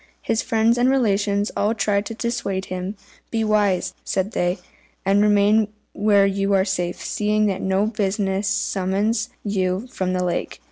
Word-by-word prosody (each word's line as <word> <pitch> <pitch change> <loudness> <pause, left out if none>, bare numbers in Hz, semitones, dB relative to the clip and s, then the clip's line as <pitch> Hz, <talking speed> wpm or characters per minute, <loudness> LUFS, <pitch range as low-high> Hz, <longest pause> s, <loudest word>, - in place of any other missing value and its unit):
His 225 - 0
friends 225 +1 +2
and 250 +1 +4
relations 205 -5 +1
all 210 +3 +1
tried 200 -1 0
to 225 - -6
dissuade 225 -5 -2
him. 185 +3 -4 0.3
"Be 225 -1 -1
wise," 200 -4 +1
said 195 +2 -1
they, 175 -1 0 0.5
"and 200 +1 +3
remain 210 +1 +4 0.3
where 205 -1 +4
you 195 0 0
are 190 -1 +3
safe, 180 -3 -2
seeing 210 0 +1
that 195 -2 -1
no 190 +2 +1
business 200 -2 -1
summons 200 +3 0
you 190 0 -1
from 185 -1 -2
the 180 0 0
lake. 180 - -2
200 Hz, 155 wpm, -22 LUFS, 190-215 Hz, 0.5 s, and